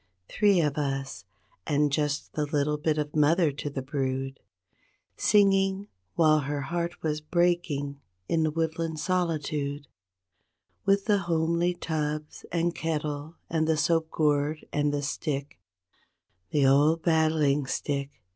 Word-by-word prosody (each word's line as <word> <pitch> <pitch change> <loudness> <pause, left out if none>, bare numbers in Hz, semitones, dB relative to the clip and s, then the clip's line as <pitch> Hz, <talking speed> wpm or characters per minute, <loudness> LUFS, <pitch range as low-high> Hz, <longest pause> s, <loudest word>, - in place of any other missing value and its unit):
24 - - -10
Three 200 -4 +5
of 150 -2 0
us—and 140 0 -3
just 145 0 -1
the 150 -1 -1
little 150 0 0
bit 155 0 0
o' 150 -1 0
mother 155 +2 +3
to 145 +1 -5
the 135 -2 -5
brood 135 -1 -3 0.8
Singing 195 -1 +3 0.3
while 155 -2 +5
her 145 0 -3
heart 170 +5 -3
was 155 -1 -1
breaking 155 -4 0 0.3
in 165 - +1
the 160 - +2
woodland 160 0 -2
solitude 150 -5 -1 1.0
With 195 0 +3
the 205 -2 +3
homely 170 0 +1
tubs 155 -2 -3
and 170 0 +1
kettle 150 -1 -3
and 160 -1 0
the 160 -1 +2
soap 160 +1 +1
gourd 150 0 0
and 145 0 +1
the 145 0 -2
stick, 140 - -3 0.9
The 145 -2 +2
old 150 +4 +4
battling 155 -4 +2
stick! 140 -2 -3
150 Hz, 130 wpm, -27 LUFS, 145-165 Hz, 1.0 s, Three